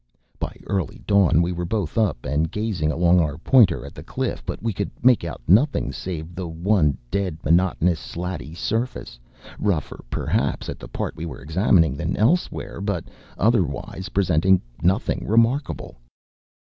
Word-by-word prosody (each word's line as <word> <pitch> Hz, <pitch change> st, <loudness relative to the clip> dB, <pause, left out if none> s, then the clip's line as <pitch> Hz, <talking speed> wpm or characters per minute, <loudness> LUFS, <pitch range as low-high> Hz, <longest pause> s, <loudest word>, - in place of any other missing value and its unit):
By -, -, -4 dB
early 95 Hz, -7 st, -3 dB
dawn 95 Hz, -5 st, +4 dB
we 85 Hz, -, -1 dB
were 90 Hz, 0 st, -3 dB
both 90 Hz, -2 st, -2 dB
up, 100 Hz, -, 0 dB
and 75 Hz, +4 st, 0 dB
gazing 105 Hz, -7 st, -1 dB
along 85 Hz, +3 st, +4 dB
our 75 Hz, -3 st, 0 dB
pointer 90 Hz, -, +4 dB
at 70 Hz, -, -10 dB
the -, -, -9 dB
cliff; -, -, -3 dB
but -, -, -4 dB
we 115 Hz, +1 st, -2 dB
could 100 Hz, +2 st, -2 dB
make 125 Hz, -5 st, +5 dB
out 85 Hz, -7 st, -6 dB
nothing 125 Hz, -, +3 dB
save 85 Hz, -2 st, -6 dB
the 90 Hz, 0 st, -5 dB
one 80 Hz, -2 st, +1 dB
dead, 95 Hz, -3 st, -1 dB
monotonous, 85 Hz, +1 st, +2 dB
slaty 85 Hz, -3 st, -6 dB
surface, 110 Hz, -, -3 dB, 0.4 s
rougher 95 Hz, -8 st, -1 dB
perhaps -, -, -1 dB
at -, -, -6 dB
the -, -, -9 dB
part -, -, -4 dB
we 85 Hz, -, -5 dB
were 70 Hz, -7 st, -8 dB
examining 80 Hz, -2 st, +3 dB
than -, -, -2 dB
elsewhere, 135 Hz, -, 0 dB
but 100 Hz, -5 st, -2 dB, 0.3 s
otherwise 95 Hz, -, 0 dB
presenting 95 Hz, -1 st, +3 dB, 0.2 s
nothing 95 Hz, +7 st, +1 dB
remarkable. 115 Hz, +6 st, +1 dB
90 Hz, 155 wpm, -23 LUFS, 80-105 Hz, 0.4 s, make